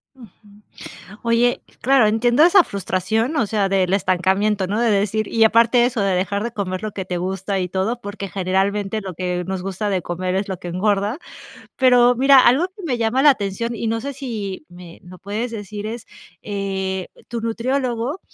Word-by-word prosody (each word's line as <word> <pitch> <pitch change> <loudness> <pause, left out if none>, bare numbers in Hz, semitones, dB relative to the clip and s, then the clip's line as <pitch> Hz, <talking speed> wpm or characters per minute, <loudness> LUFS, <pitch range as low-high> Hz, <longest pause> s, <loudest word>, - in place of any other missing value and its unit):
Ujú. 235 -6 -14 0.9
Oye, 235 +1 +2 0.2
claro, 260 -3 +4
entiendo 240 +6 +3
esa 355 +2 +7
frustración, 200 - -2
o 230 -7 +2
sea, 200 -2 0
del 190 -1 +2
estancamiento, 190 +1 +1
¿no? 205 +4 -2
De 235 -2 +2
decir 210 +1 0
y 225 - 0
aparte 235 +2 +4
eso, 245 -3 -2
de 195 -1 +1
dejar 200 +3 -1
de 235 - -4
comer 185 -2 -4
lo 215 -1 -4
que 190 - -5
te 180 - -3
gusta 190 +2 -2
y 180 - -2
todo, 195 +7 -1
porque 205 -3 -6
generalmente 195 +3 -1
lo 190 -3 -7
que 180 +1 -2
nos 190 -1 -3
gusta 195 +2 -3
de 190 -3 -1
comer 180 +2 -3
es 195 +1 -1
lo 190 - -4
que 175 - -8
engorda. 205 - 0 0.6
Pero 245 -1 +5
mira, 270 +1 +6
algo 265 +8 +4
que 395 - -11
me 250 -7 -1
llama 230 +4 +1
la 295 - +8
atención, 230 0 -2
y 230 - -4
no 225 0 -1
sé, 280 +4 -5
si 215 - -6
me 175 -1 -13
lo 180 0 -12
puedes 220 +4 -4
decir 210 -1 -6
es 225 +1 -6 0.4
eh, 190 -2 -3 0.2
tu 235 -1 -4
nutriólogo, 245 +5 -2
210 Hz, 190 wpm, -20 LUFS, 190-235 Hz, 0.9 s, la